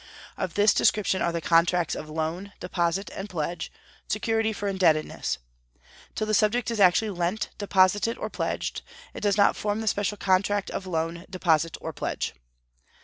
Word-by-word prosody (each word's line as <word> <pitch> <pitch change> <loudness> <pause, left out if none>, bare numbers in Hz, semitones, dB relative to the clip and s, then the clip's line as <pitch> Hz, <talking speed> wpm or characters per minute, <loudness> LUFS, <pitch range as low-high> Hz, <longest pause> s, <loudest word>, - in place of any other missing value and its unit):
Of 170 - -4
this 205 0 +5
description 195 -2 +2
are 170 - +1
the 170 0 -3
contracts 170 +1 +3
of 155 - -6
loan, 165 +5 -3
deposit, 180 +2 -1
and 195 +2 -6
pledge, 165 -2 -3 0.4
security 225 +1 0
for 205 -1 -4
indebtedness. 170 -6 +1 0.8
Till 215 - -1
the 215 - -1
subject 220 +3 +2
is 230 - -3
actually 200 +3 +4
lent, 180 +3 -2
deposited, 205 +2 +3
or - - -3
pledged, - - -3 0.3
it - - -7
does 205 -1 +2
not 200 - +5
form 210 0 -1
the 220 - -4
special 205 0 0
contract 195 +1 +1
of 190 - -5
loan, 165 0 -2
deposit, 165 -3 +1
or - - -6
pledge." - - -3
190 Hz, 160 wpm, -26 LUFS, 170-205 Hz, 0.8 s, this